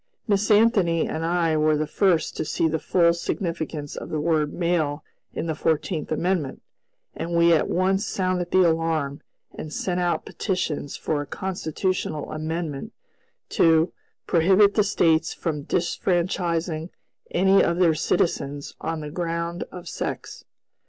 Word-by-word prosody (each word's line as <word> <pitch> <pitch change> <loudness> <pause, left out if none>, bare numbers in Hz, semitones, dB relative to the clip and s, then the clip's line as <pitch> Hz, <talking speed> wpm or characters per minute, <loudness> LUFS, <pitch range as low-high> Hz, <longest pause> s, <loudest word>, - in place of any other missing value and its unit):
Miss 205 0 +1
Anthony 205 -6 +4
and 160 - -3
I 165 -1 +1
were 155 0 +3
the 155 - 0
first 170 -1 +1
to - - -1
see 160 +1 0
the 160 0 -1
full 170 0 +3
significance 165 -4 -4
of - - -7
the 155 - -2
word 150 -1 +1
"male" 160 -4 0 0.3
in - - -2
the 160 - -1
Fourteenth 160 +1 -1
Amendment, 165 -3 -1 0.5
and 170 0 -2
we 170 0 +5
at 160 - +2
once 190 +2 +1
sounded 185 -2 -1
the 185 -1 +5
alarm, 160 -3 0 0.3
and 155 - -7
sent 180 +2 -2
out 175 -1 0
petitions 180 -7 -3
for 150 -2 -1
a 145 - -7
constitutional 185 -3 -3
amendment 155 -2 -4 0.6
to 165 0 +3 0.3
"prohibit 190 +4 +4
the 210 - +3
States 165 -5 +2
from 150 -4 -3
disfranchising 170 -2 -1 0.4
any 190 +2 +4
of 170 - +1
their 175 -3 +4
citizens 145 -3 -1
on 160 -1 -3
the 150 -1 -6
ground 170 0 -3
of 180 -1 -9
sex." - - -5
170 Hz, 145 wpm, -24 LUFS, 155-180 Hz, 0.6 s, we